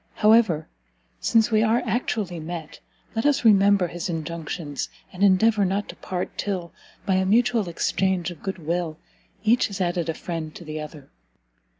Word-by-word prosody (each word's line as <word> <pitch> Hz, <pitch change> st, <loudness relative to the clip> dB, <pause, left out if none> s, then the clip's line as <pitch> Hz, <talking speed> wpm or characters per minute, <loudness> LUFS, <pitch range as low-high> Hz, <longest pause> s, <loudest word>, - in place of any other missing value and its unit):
However, 215 Hz, -8 st, +4 dB, 0.5 s
since 225 Hz, 0 st, +3 dB
we 215 Hz, -1 st, +4 dB
are 225 Hz, +2 st, +2 dB
actually 215 Hz, -6 st, -1 dB
met, 160 Hz, 0 st, -7 dB, 0.4 s
let 225 Hz, -, 0 dB
us 290 Hz, -4 st, +2 dB
remember 200 Hz, -2 st, +5 dB
his 175 Hz, +3 st, -5 dB
injunctions, 160 Hz, -2 st, -4 dB, 0.2 s
and 180 Hz, -, -8 dB
endeavour 205 Hz, +2 st, +4 dB
not 195 Hz, +2 st, 0 dB
to -, -, -7 dB
part 180 Hz, -1 st, -4 dB
till, 180 Hz, -5 st, -3 dB, 0.3 s
by 195 Hz, -, +1 dB
a 190 Hz, -, +2 dB
mutual 225 Hz, -2 st, +3 dB
exchange 180 Hz, +1 st, 0 dB
of 165 Hz, -, -12 dB
good 195 Hz, -1 st, -4 dB
will, 165 Hz, -1 st, -2 dB, 0.5 s
each 230 Hz, +3 st, +4 dB
has 200 Hz, -1 st, -7 dB
added 175 Hz, -2 st, 0 dB
a 160 Hz, -, -1 dB
friend 165 Hz, -3 st, -5 dB
to 170 Hz, -, -10 dB
the 155 Hz, 0 st, -5 dB
other." 150 Hz, -2 st, -10 dB
185 Hz, 165 wpm, -24 LUFS, 165-215 Hz, 0.5 s, remember